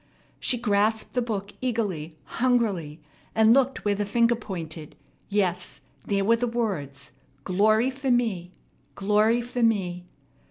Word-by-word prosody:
She 250 - +1
grasped 215 -1 +1
the 250 - +1
book 205 -4 -3
eagerly, 200 -11 -2 0.3
hungrily, 205 -12 +1 0.4
and 220 0 +6
looked 270 -2 +1
where 205 - +3
the 205 +1 -1
finger 230 +3 +3
pointed. 165 -8 -7 0.3
Yes, 180 -7 -1 0.3
there 200 -1 +1
were 230 +2 +4
the 245 +1 -1
words. 195 - -3 0.3
"Glory 215 - +3
for 265 0 -4
me!" 220 -8 +1 0.4
"Glory 210 +4 +2
for 245 +1 -4
me!" 180 -6 +1
210 Hz, 130 wpm, -26 LUFS, 185-235 Hz, 0.4 s, and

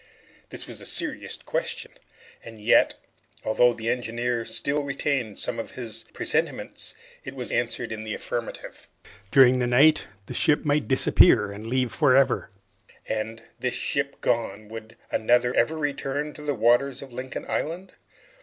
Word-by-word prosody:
This - - -7
was - - -8
a - - -8
serious - - 0
question, - - -4 0.5
and 115 -1 -11
yet, 105 - +4 0.5
although 120 +3 +4
the 115 0 -2
engineer 120 -1 -2
still 145 +1 -1
retained 135 -5 -2
some 120 -2 -3
of 115 - -7
his 115 -2 -5
presentiments, - - -2 0.3
it - - -8
was - - -5
answered - - -1
in 110 -1 -5
the 110 -1 -4
affirmative. 120 -1 -6 0.4
During 130 0 +6
the 125 - +1
night 145 +6 +5 0.2
the - - -7
ship 150 0 +2
might 145 0 +1
disappear 125 - +5
and 105 +2 -8
leave 125 0 0
for 140 -5 +4
ever, 135 0 +3 0.6
and, 110 +1 -3 0.2
this 125 -1 -1
ship 140 0 -2
gone, 110 -2 -1
would 115 0 -9
another 120 +2 +2
ever 160 +7 +2
return 145 0 -2
to - - -11
the 145 -1 -1
waters 120 +5 +2
of 135 -3 -12
Lincoln 130 +2 -6
Island? 175 +5 -3
125 Hz, 155 wpm, -25 LUFS, 115-140 Hz, 0.6 s, During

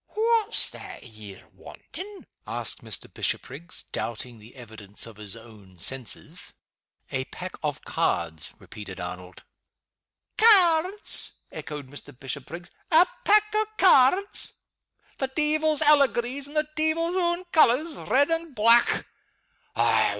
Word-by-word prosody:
"What's 450 +1 +1
that 380 -3 -10
ye're 105 -4 -13
wantin'?" 400 +1 -11 0.2
asked - - -2
Mr. - - 0
Bishopriggs, 160 +7 -2
doubting 115 +1 -5
the 110 +5 -15
evidence 110 -5 -6
of 115 -2 -12
his 105 -1 -4
own 105 -5 -15
senses. 125 +6 0 0.6
"A - - -2
pack - - -8
of - - -4
cards," 80 -2 -2
repeated 100 -3 -10
Arnold. 90 +1 -8 1.0
"Cairds?" 385 -3 +4
echoed 150 -2 -7
Mr. 135 -2 -8
Bishopriggs. 140 +6 -7 0.2
"A 330 +3 +7 0.2
pack 425 0 +3
o' 430 0 +1
cairds? 370 +3 +4 0.7
The 270 - 0
deevil's 310 +2 +1
allegories 280 -2 +2
in 290 - -12
the 305 0 +1
deevil's 325 +3 0
own 345 -1 0
colors 310 +1 +3
red 285 +4 +1
and 330 -3 -2
black! 230 +2 +4
265 Hz, 115 wpm, -25 LUFS, -, 1.0 s, A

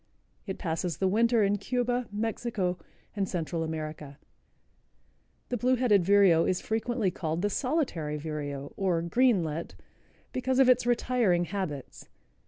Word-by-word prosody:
It 190 - -4
passes 165 -2 -2
the 190 - +1
winter 230 +3 +3
in 200 +1 +1
Cuba, 245 +2 -1
Mexico 210 -4 -2 0.4
and 195 -2 -1
Central 165 -1 -2
America. 155 -3 -6 1.3
The 245 - -1
Blue 255 +3 +2
headed 225 -7 +3
Vireo 190 -3 +5
is 185 0 +1
frequently 225 -2 -1
called 165 0 -3
the 205 - +1
Solitary 250 - -1
Vireo, 145 -2 -5
or 180 -4 +1
Greenlet, 170 -6 +1 0.6
because 255 0 0
of 265 -1 +6
its 250 -1 +4
retiring 235 -7 +2
habits. 170 -9 -5
195 Hz, 130 wpm, -28 LUFS, 165-240 Hz, 1.3 s, of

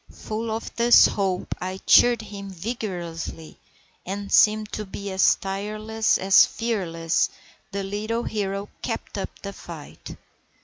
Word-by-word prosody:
Full 220 +1 -5
of 220 +1 -4
this 240 +1 +7
hope 190 -3 -1
I 185 +1 -3
cheered 240 -2 +6
him 200 -1 -8
vigorously, 175 -5 -6 0.4
and 200 +2 -5
seeming 215 0 +5
to 215 - -3
be 200 0 -6
as 190 0 +4
tireless 215 +3 -1
as 190 +1 +6
fearless, 175 -8 -1 0.4
the 200 0 -3
little 215 +4 -2
hero 200 -1 -3
kept - - -4
up - - -3
the 200 0 -5
fight. 165 -5 -10
200 Hz, 130 wpm, -24 LUFS, 190-215 Hz, 0.4 s, this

